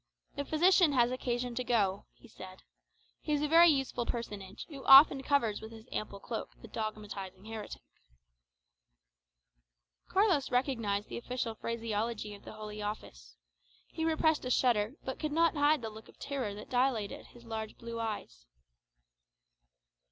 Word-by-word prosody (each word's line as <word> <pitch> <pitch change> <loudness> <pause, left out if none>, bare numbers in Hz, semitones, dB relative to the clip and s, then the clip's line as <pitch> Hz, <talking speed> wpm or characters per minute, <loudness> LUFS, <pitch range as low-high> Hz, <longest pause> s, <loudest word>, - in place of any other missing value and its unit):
"The 285 - -3
physician 345 0 +4
has 245 -2 +3
occasion 245 -1 -2
to 250 - -2
go," 205 -6 +1
he - - -17
said; - - -12 0.6
"he 300 - -2
is 295 0 +1
a - - +2
very 335 +3 +7
useful 270 -5 0
personage, 205 -5 -5
who 280 -4 -9
often 270 0 +9
covers 255 -7 +1
with 220 - -9
his 225 -1 -12
ample 200 -2 -4
cloak 225 +2 -5
the - - -11
dogmatizing 205 -3 -6
heretic." 220 -1 -7 2.3
Carlos 375 -8 +2
recognized 230 -6 0
the - - -5
official 245 -1 -3
phraseology 225 -1 -3
of 200 - -13
the - - -9
Holy 215 -1 -7
Office. 60 - -7 0.5
He 320 - -4
repressed 315 -1 +2
a 250 - -3
shudder, 240 -2 +2
but 265 - -4
could 305 - -2
not 330 +2 +3
hide 290 -2 +3
the 220 - -4
look 220 +1 -12
of - - -18
terror 260 -8 -3
that 210 - -10
dilated 245 -5 0
his 240 0 -17
large 220 -1 -5
blue 230 0 -6
eyes. 205 - -5
235 Hz, 150 wpm, -32 LUFS, 215-275 Hz, 2.3 s, often